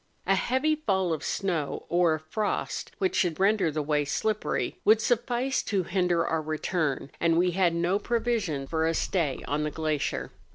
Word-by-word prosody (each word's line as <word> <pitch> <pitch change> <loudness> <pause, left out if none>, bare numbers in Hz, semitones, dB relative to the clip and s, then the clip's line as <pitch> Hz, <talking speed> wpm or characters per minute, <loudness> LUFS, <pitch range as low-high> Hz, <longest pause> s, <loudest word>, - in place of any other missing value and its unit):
A 195 - +3
heavy 260 +10 +1
fall 190 - 0
of 155 - -4
snow, 170 -7 -2
or 170 -2 +3
a - - -6
frost 180 +8 -3
which 375 -2 0
should 175 -4 +1
render 195 -3 +3
the 155 0 -2
way 150 0 +1
slippery, 215 +9 -1
would 215 +1 +5
suffice 245 +3 0
to 195 -3 -1
hinder 175 -1 +1
our 160 -1 0
retura, 155 -2 -2
and 165 -1 +3
we 180 +1 +3
had 175 -2 +2
no 175 +4 +1
provision 225 - -1
for 160 +2 0
a 165 - 0
stay 155 -8 -1
on 145 +1 0
the 150 - 0
glacier. 155 -1 -2
175 Hz, 175 wpm, -27 LUFS, 155-210 Hz, -, would